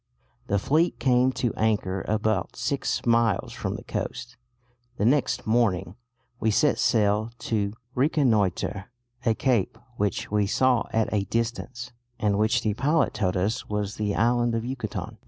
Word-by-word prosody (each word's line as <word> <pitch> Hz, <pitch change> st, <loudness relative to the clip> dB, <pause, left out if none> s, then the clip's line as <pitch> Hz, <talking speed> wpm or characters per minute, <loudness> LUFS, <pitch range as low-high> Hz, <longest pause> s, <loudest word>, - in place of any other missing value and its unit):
The 100 Hz, -, +1 dB
fleet 155 Hz, -, +1 dB
came 125 Hz, 0 st, +3 dB
to 120 Hz, -3 st, -1 dB
anchor 100 Hz, -4 st, 0 dB
about 110 Hz, -2 st, 0 dB
six -, -, -2 dB
miles 115 Hz, -3 st, +2 dB
from -, -, -3 dB
the -, -, -8 dB
coast.... 125 Hz, +1 st, -5 dB, 0.6 s
The 100 Hz, -, 0 dB
next 125 Hz, -1 st, +2 dB
morning 105 Hz, -5 st, +1 dB, 0.4 s
we 110 Hz, -, +1 dB
set 145 Hz, +8 st, +2 dB
sail 105 Hz, -1 st, +2 dB, 0.2 s
to 100 Hz, -2 st, 0 dB, 0.2 s
reconnoitre 115 Hz, -, +1 dB, 0.4 s
a 115 Hz, -, +3 dB
cape 115 Hz, -4 st, +1 dB, 0.2 s
which 100 Hz, -2 st, -1 dB
we 105 Hz, -1 st, +2 dB
saw 125 Hz, +2 st, +2 dB
at 110 Hz, -1 st, 0 dB
a 100 Hz, -2 st, +1 dB
distance, 120 Hz, +2 st, -3 dB, 0.3 s
and 105 Hz, -2 st, +1 dB
which 110 Hz, +3 st, +2 dB
the 105 Hz, -, +1 dB
pilot 150 Hz, +8 st, +1 dB
told 95 Hz, -4 st, 0 dB
us 100 Hz, +5 st, -1 dB
was 105 Hz, -1 st, -2 dB
the 105 Hz, -2 st, -1 dB
island 120 Hz, 0 st, +2 dB
of 115 Hz, 0 st, -2 dB
Yucatan. 125 Hz, -4 st, -5 dB
110 Hz, 150 wpm, -26 LUFS, 105-125 Hz, 0.6 s, came